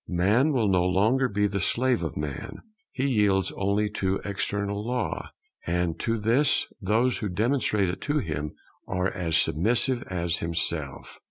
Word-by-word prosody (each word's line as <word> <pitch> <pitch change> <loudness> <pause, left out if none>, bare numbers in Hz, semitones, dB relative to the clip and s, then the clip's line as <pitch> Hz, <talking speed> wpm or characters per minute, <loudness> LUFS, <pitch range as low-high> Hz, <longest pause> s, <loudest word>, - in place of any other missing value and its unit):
Man 105 - +2
will 120 -7 +2
no 90 -2 +3
longer 110 +9 +2
be 105 0 +1
the 100 -1 -1
slave 125 +4 +2
of 80 - -4
man; 75 -3 -5 0.3
he 135 - -2
yields 105 -6 +2
only 100 +2 0
to 95 0 +1
external 100 0 -2
Law; 125 +2 -2 0.4
and 85 -1 0
to 115 0 0
this 120 +7 +3 0.2
those 115 +5 +1
who 105 - -2
demonstrate 105 0 +1
it 90 - -4
to 150 0 0
him 75 - -3 0.3
are 90 0 0
as 85 -5 0
submissive 120 - +1
as 85 -2 -1
himself. 85 -4 -3
100 Hz, 155 wpm, -26 LUFS, 90-115 Hz, 0.4 s, no